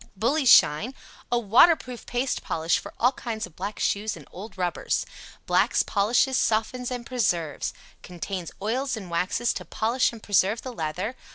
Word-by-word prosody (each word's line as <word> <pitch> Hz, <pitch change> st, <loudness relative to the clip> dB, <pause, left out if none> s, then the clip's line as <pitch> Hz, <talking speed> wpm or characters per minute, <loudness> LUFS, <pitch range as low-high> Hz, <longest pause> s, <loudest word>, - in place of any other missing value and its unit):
"BULLY 265 Hz, +7 st, +1 dB
SHINE." 220 Hz, -, +5 dB, 0.4 s
A 240 Hz, -, +3 dB
waterproof 245 Hz, -, +3 dB
paste 250 Hz, +2 st, -1 dB
polish 165 Hz, +1 st, 0 dB
for -, -, -9 dB
all 245 Hz, +2 st, +4 dB
kinds 230 Hz, -4 st, -5 dB
of 175 Hz, -4 st, -16 dB
black 200 Hz, +3 st, -5 dB
shoes 210 Hz, -1 st, -1 dB
and 150 Hz, -, -13 dB
old 195 Hz, +2 st, -10 dB
rubbers. 180 Hz, -2 st, -1 dB, 0.4 s
Blacks, -, -, +3 dB
polishes, 240 Hz, +6 st, +2 dB
softens 235 Hz, +3 st, 0 dB
and 245 Hz, -2 st, -5 dB
preserves. 180 Hz, -, -1 dB, 0.3 s
Contains 180 Hz, 0 st, -6 dB
oils 255 Hz, +3 st, -1 dB
and 190 Hz, -5 st, -8 dB
waxes 185 Hz, +8 st, 0 dB
to -, -, -6 dB
polish 235 Hz, +4 st, 0 dB
and 230 Hz, -2 st, -12 dB
preserve 205 Hz, +2 st, +2 dB
the 255 Hz, -, -6 dB
leather. 185 Hz, +6 st, -3 dB
220 Hz, 160 wpm, -25 LUFS, 185-245 Hz, 0.4 s, SHINE